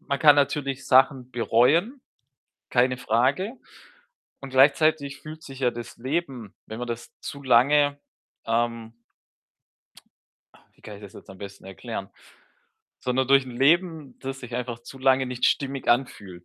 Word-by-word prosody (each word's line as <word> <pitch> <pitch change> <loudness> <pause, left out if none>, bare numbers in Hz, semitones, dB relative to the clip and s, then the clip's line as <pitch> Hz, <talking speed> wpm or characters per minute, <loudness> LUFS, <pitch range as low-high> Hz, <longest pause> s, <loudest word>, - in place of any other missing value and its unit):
man 140 - -3
kann 150 0 +7
natürlich 140 -1 -1
Sachen 130 -1 +3
bereuen, 140 - +2 0.7
keine 125 0 +2
Frage. 130 - 0 0.9
Und 135 - -9
gleichzeitig 140 +1 +3
fühlt 155 +1 -10
sich 135 -3 -11
ja 125 -2 +2
das 120 -1 -9
Leben, 130 - -4
wenn 110 - -8
man 125 - -4
das 115 0 -7
zu 140 - -8
lange, 140 +3 +4 0.5
ähm 115 0 -1 1.6
ah, - - -23
wie - - -28
kann 105 - -9
ich 100 - -15
das 100 - -11
jetzt - - -13
am 95 - -13
besten 100 -1 -10
erklären? 95 +1 -7 0.9
Sondern 130 +1 0
durch 135 -1 +5
'n 130 - -9
Leben, 155 -1 +1
das 135 0 -6
sich 125 -2 -8
einfach 120 -1 -4
zu 135 +3 -12
lange 130 0 +3
nicht 125 -1 -3
stimmig 135 -1 -1
anfühlt. 100 -8 -1
130 Hz, 150 wpm, -25 LUFS, 120-140 Hz, 1.6 s, kann